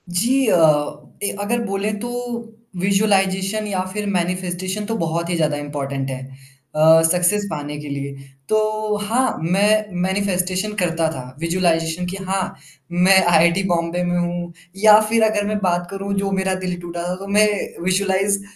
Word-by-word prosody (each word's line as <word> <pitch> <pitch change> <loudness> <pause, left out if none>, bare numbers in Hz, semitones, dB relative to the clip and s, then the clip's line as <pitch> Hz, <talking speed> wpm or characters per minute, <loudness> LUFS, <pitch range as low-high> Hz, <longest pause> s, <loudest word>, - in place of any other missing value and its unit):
जी 240 +10 +2
अ, 195 - +4 0.7
ए 200 - +1
अगर 235 +4 0
बोले 195 +1 -1
तो 240 - -4 0.7
विज़ुअलाइज़ेशन 195 +1 +1
या 190 -3 -1
फिर 210 0 -3
मैनिफेस्टेशन 185 +2 -2
तो 225 +1 -2
बहुत 170 0 -2
ही 175 - 0
ज़्यादा 155 -3 0
इम्पोर्टेंट 140 -2 -4
है 130 -1 -4 0.6
अ, 160 +1 +6
सक्सेस 180 +4 +2
पाने 150 -1 -5
के 150 0 -7
लिए। 140 0 -4 0.4
तो 215 0 0
हाँ, 250 +5 +1
मैं 205 +4 +2
मैनिफेस्टेशन 190 +1 -1
करता 165 -2 +1
था, 130 -5 -6 0.2
विज़ुअलाइज़ेशन 165 0 0
कि 180 +2 -5
हाँ, 190 -1 -1 0.4
मैं 180 +2 +5
आईआईटी 170 +2 +4
बॉम्बे 170 +1 0
में 175 0 0
हूँ। 175 0 -3 0.3
या 215 -1 +9
फिर 225 0 +3
अगर 215 -2 +2
मैं 215 0 -1
बात 175 -1 +1
करूँ 195 0 -4
जो 195 0 -1
मेरा 190 0 0
दिल 180 -1 -3
टूटा 170 0 -5
था, 180 - -2
तो 195 +2 -9
मैं 210 +1 +4 0.4
विज़ुअलाइज़ 195 +1 +1
185 Hz, 160 wpm, -20 LUFS, 170-205 Hz, 0.7 s, या